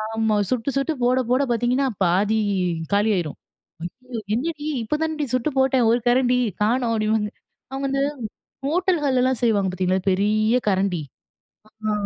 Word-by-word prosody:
ஆமா. 220 Hz, -1 st, +1 dB
சுட்டு, 250 Hz, +1 st, -1 dB
சுட்டு 275 Hz, +4 st, 0 dB
போட 250 Hz, +1 st, +3 dB
போட 255 Hz, +2 st, +3 dB
பார்த்திங்கன்னா 245 Hz, +4 st, +1 dB, 0.2 s
பாதி 195 Hz, +5 st, +2 dB, 0.6 s
காலி 205 Hz, +2 st, +3 dB
ஆயிரும். 160 Hz, -5 st, -3 dB, 1.0 s
என்னடி! 300 Hz, +3 st, -3 dB, 0.2 s
இப்போ 225 Hz, +7 st, -1 dB
தானடி 315 Hz, -2 st, -1 dB
சுட்டு 255 Hz, +3 st, +1 dB
போட்டேன் 265 Hz, -3 st, +3 dB
1 235 Hz, -, +3 dB
கரண்டி 250 Hz, 0 st, +3 dB, 0.3 s
காணும் 235 Hz, +2 st, +1 dB
அப்படின்பாங்க. 215 Hz, -1 st, 0 dB, 0.4 s
அவுங்க 270 Hz, +1 st, -3 dB
வந்து 275 Hz, 0 st, 0 dB, 0.7 s
ஹோட்டல்கள்லாம் 285 Hz, -7 st, +1 dB
செய்வாங்க 205 Hz, -5 st, +2 dB
பார்த்தீங்களா 185 Hz, +1 st, 0 dB
பெரிய 215 Hz, +4 st, +2 dB
கரண்டி, 190 Hz, -3 st, +1 dB, 0.9 s
ஆ, 215 Hz, -, +1 dB
240 Hz, 130 wpm, -22 LUFS, 210-270 Hz, 1.0 s, போட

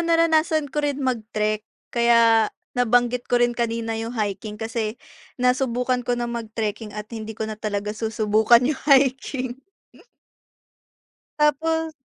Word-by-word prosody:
naranasan 320 Hz, -3 st, +2 dB
ko 295 Hz, -, 0 dB
rin 290 Hz, -2 st, -1 dB
mag 250 Hz, -3 st, 0 dB, 0.2 s
trek, 215 Hz, 0 st, +1 dB, 0.3 s
kaya 230 Hz, -2 st, +4 dB, 0.3 s
nabanggit 245 Hz, 0 st, +2 dB
ko 245 Hz, -, +3 dB
rin 240 Hz, 0 st, +3 dB
kanina 230 Hz, -1 st, -2 dB
yung 230 Hz, +2 st, -5 dB
hiking, 210 Hz, 0 st, -3 dB
kasi 225 Hz, 0 st, -3 dB, 0.4 s
nasubukan 250 Hz, 0 st, +1 dB
ko 245 Hz, -, +1 dB
na 240 Hz, -, -2 dB
mag 230 Hz, -2 st, -5 dB
trekking 215 Hz, -1 st, -3 dB
at 210 Hz, +1 st, -6 dB
hindi 220 Hz, -1 st, -6 dB
ko 220 Hz, -, -3 dB
na 215 Hz, -1 st, -6 dB
talaga 210 Hz, -1 st, -3 dB
susubukan 220 Hz, +1 st, +3 dB
yung 285 Hz, +1 st, -1 dB
hiking. 265 Hz, -2 st, +2 dB, 1.8 s
Tapos 320 Hz, +2 st, +1 dB
235 Hz, 135 wpm, -23 LUFS, 220-260 Hz, 1.8 s, kaya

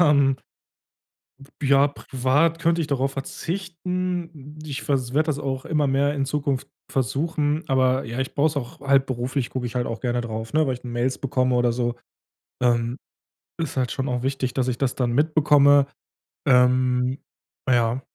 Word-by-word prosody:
Ähm 140 Hz, -5 st, +4 dB, 1.3 s
Ja, 140 Hz, 0 st, +5 dB
privat 145 Hz, +4 st, 0 dB
könnte 165 Hz, 0 st, +2 dB
ich 160 Hz, -, 0 dB
darauf 135 Hz, -1 st, 0 dB
verzichten. 170 Hz, 0 st, -4 dB
Ich 145 Hz, -2 st, -5 dB
vers 130 Hz, -4 st, -1 dB
werde 155 Hz, +3 st, +2 dB
das 150 Hz, -3 st, -1 dB
auch 135 Hz, -2 st, -3 dB
immer 150 Hz, -3 st, +1 dB
mehr 140 Hz, +2 st, +2 dB
in 140 Hz, -2 st, 0 dB
Zukunft 140 Hz, -1 st, -1 dB, 0.2 s
versuchen, 150 Hz, -, 0 dB
aber 130 Hz, -1 st, +2 dB
ja, 115 Hz, +2 st, -5 dB
ich 130 Hz, 0 st, -3 dB
brauche 145 Hz, +1 st, +3 dB
es 155 Hz, -1 st, -1 dB
auch 125 Hz, -4 st, -5 dB
halt 140 Hz, -1 st, +3 dB
beruflich 130 Hz, 0 st, -2 dB
gucke 125 Hz, -2 st, -3 dB
ich 120 Hz, -, -7 dB
halt 125 Hz, -1 st, 0 dB
auch 115 Hz, -1 st, -4 dB
gerne 120 Hz, -1 st, -1 dB
drauf, 110 Hz, 0 st, -5 dB
ne, 155 Hz, 0 st, +3 dB
weil 130 Hz, -, 0 dB
ich 125 Hz, -, -12 dB
Mails 120 Hz, +1 st, -1 dB
bekomme 130 Hz, -1 st, +1 dB
oder 120 Hz, -1 st, +2 dB
so. 120 Hz, 0 st, -1 dB, 0.7 s
Ähm, 120 Hz, 0 st, +1 dB, 0.6 s
ist 160 Hz, -5 st, -4 dB
halt 125 Hz, -2 st, 0 dB
schon 135 Hz, 0 st, -2 dB
auch 125 Hz, -1 st, -1 dB
wichtig, 130 Hz, -1 st, -2 dB
dass 130 Hz, -1 st, 0 dB
ich 125 Hz, -1 st, -1 dB
das 135 Hz, -2 st, 0 dB
dann 125 Hz, -2 st, 0 dB
mitbekomme. 145 Hz, -1 st, +5 dB, 0.6 s
Ähm, 125 Hz, +1 st, +3 dB, 0.5 s
ja. 120 Hz, 0 st, +2 dB
135 Hz, 170 wpm, -24 LUFS, 125-145 Hz, 1.3 s, Ja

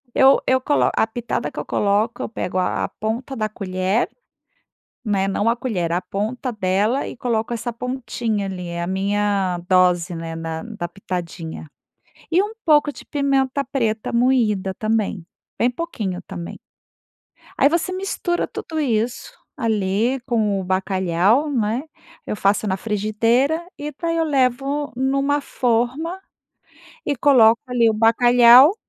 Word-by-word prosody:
Eu 270 Hz, +1 st, +6 dB
eu 260 Hz, 0 st, +3 dB
colo 290 Hz, -, +2 dB
a 220 Hz, -, +2 dB
pitada 240 Hz, +1 st, -3 dB
que -, -, -6 dB
eu -, -, -5 dB
coloco 210 Hz, +3 st, 0 dB
eu -, -, -4 dB
pego 185 Hz, -4 st, -3 dB
a 180 Hz, -, 0 dB
a -, -, -6 dB
ponta 235 Hz, +5 st, -3 dB
da 215 Hz, -1 st, -1 dB
colher, 190 Hz, +1 st, -1 dB, 1.0 s
né, 195 Hz, -3 st, +1 dB
não 205 Hz, +3 st, 0 dB
a 230 Hz, -, +3 dB
colher, 185 Hz, -10 st, -2 dB
a 175 Hz, +2 st, 0 dB
ponta 220 Hz, +7 st, -3 dB
dela 210 Hz, +5 st, 0 dB
e -, -, -8 dB
coloco 235 Hz, -1 st, -1 dB
essa 235 Hz, +1 st, -4 dB
pontinha 235 Hz, -4 st, -3 dB
ali, 185 Hz, -2 st, -5 dB
é 170 Hz, 0 st, -4 dB
a -, -, -2 dB
minha 195 Hz, -1 st, 0 dB
dose, 180 Hz, -1 st, +3 dB
né, 165 Hz, 0 st, -5 dB
na 165 Hz, 0 st, -4 dB
da 215 Hz, -7 st, -5 dB
pitadinha. 170 Hz, -4 st, -6 dB, 0.6 s
E 355 Hz, -, +4 dB
um 420 Hz, +2 st, -5 dB
pouco 295 Hz, -2 st, +4 dB
de -, -, -12 dB
pimenta 275 Hz, -1 st, 0 dB
preta 225 Hz, -5 st, -2 dB
moída 230 Hz, -6 st, +2 dB
também, 215 Hz, -4 st, -1 dB, 0.4 s
bem 240 Hz, -, +3 dB
pouquinho 215 Hz, -, -4 dB
também. 170 Hz, -1 st, -7 dB, 1.0 s
Aí -, -, +5 dB
você 340 Hz, +2 st, 0 dB
mistura 370 Hz, -2 st, -2 dB
tudo 320 Hz, -, -6 dB
isso, 235 Hz, -3 st, -1 dB, 0.2 s
ali 225 Hz, +1 st, 0 dB
com 215 Hz, -6 st, +1 dB
o -, -, -5 dB
bacalhau, 190 Hz, -, +1 dB
né? 235 Hz, -1 st, 0 dB, 0.4 s
Eu 210 Hz, -, -3 dB
faço 200 Hz, +2 st, +1 dB
na 190 Hz, -2 st, 0 dB
frigideira, 230 Hz, -, +1 dB
e 295 Hz, +1 st, -4 dB
daí 330 Hz, -1 st, 0 dB
eu 325 Hz, -, +2 dB
levo 275 Hz, +1 st, 0 dB
numa 275 Hz, +2 st, +1 dB
forma, 260 Hz, +9 st, -1 dB, 0.9 s
e 290 Hz, -, +1 dB
coloco 235 Hz, -4 st, +5 dB
ali 240 Hz, -2 st, +3 dB
o 220 Hz, -, -1 dB
bacalhau, 240 Hz, -, +7 dB
225 Hz, 145 wpm, -21 LUFS, 195-265 Hz, 1.0 s, bacalhau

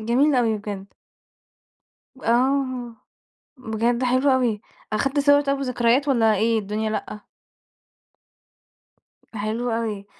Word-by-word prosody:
جميل 255 Hz, +6 st, +2 dB
أوي 225 Hz, -4 st, +1 dB
بجد. 200 Hz, -1 st, -7 dB, 1.3 s
آه، 255 Hz, -1 st, 0 dB, 0.6 s
بجد 235 Hz, +1 st, -1 dB
حلو 255 Hz, +3 st, +2 dB
أوي، 245 Hz, -5 st, +1 dB, 0.3 s
أخدت 270 Hz, +6 st, 0 dB
صور 285 Hz, 0 st, +5 dB
طَب 275 Hz, -1 st, -1 dB
وذكريات، 250 Hz, +1 st, +1 dB
والّا 225 Hz, -5 st, +3 dB
إيه 225 Hz, +2 st, +1 dB
الدنيا 215 Hz, +1 st, -3 dB
لأ؟ 210 Hz, -1 st, -5 dB, 2.1 s
حلو 220 Hz, +3 st, -2 dB
أوي، 220 Hz, -3 st, -3 dB
235 Hz, 100 wpm, -23 LUFS, 215-260 Hz, 2.1 s, صور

